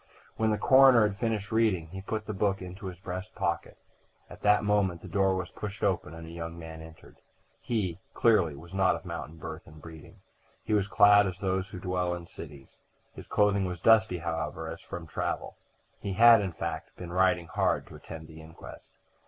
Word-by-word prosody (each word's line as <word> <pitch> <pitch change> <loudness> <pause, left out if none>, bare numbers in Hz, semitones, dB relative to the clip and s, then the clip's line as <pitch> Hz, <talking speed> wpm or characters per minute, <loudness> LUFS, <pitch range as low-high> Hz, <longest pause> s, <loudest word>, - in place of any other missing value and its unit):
When 110 0 +1
the 105 - +1
coroner 130 -4 +6
had 100 0 -7
finished 110 -2 -2
reading 105 -8 +1
he 95 +3 -7
put 110 +2 -4
the 105 - -4
book 100 0 0
into 95 +2 -8
his 90 -1 -8
breast 95 +1 -6
pocket. 85 -4 -2 0.5
At - - -12
that 105 0 +4
moment 100 -5 +1
the - - -8
door 95 -1 +2
was 90 -3 -4
pushed 105 0 -7
open 90 -5 0
and 80 0 -9
a 80 - -10
young 85 0 -6
man 80 -1 -9
entered. 80 0 -14 0.4
He, 95 -7 -2 0.2
clearly, 100 -10 +3
was 85 +5 -13
not 95 -1 +3
of - - -9
mountain 80 - -6
birth 80 +1 -8
and 75 -1 -14
breeding: 80 0 -13 0.4
he 110 - -2
was 100 -2 +2
clad 100 0 +6
as 90 -1 -5
those 95 0 -1
who 90 - -8
dwell 90 -1 -1
in 85 -1 -8
cities. 75 -5 -12 0.3
His - - -11
clothing 100 -2 +2
was 90 -1 -4
dusty, 110 -1 +4
however, 80 -1 -4
as - - -8
from 85 -2 -7
travel. - - -3 0.4
He 100 - -4
had, 115 +2 +7
in 95 -4 -3
fact, - - -5
been 85 -1 -8
riding 90 -2 +3
hard - - 0
to - - -13
attend 80 -1 -10
the 80 0 -12
inquest. 80 +1 -13
95 Hz, 200 wpm, -29 LUFS, 85-105 Hz, 0.5 s, had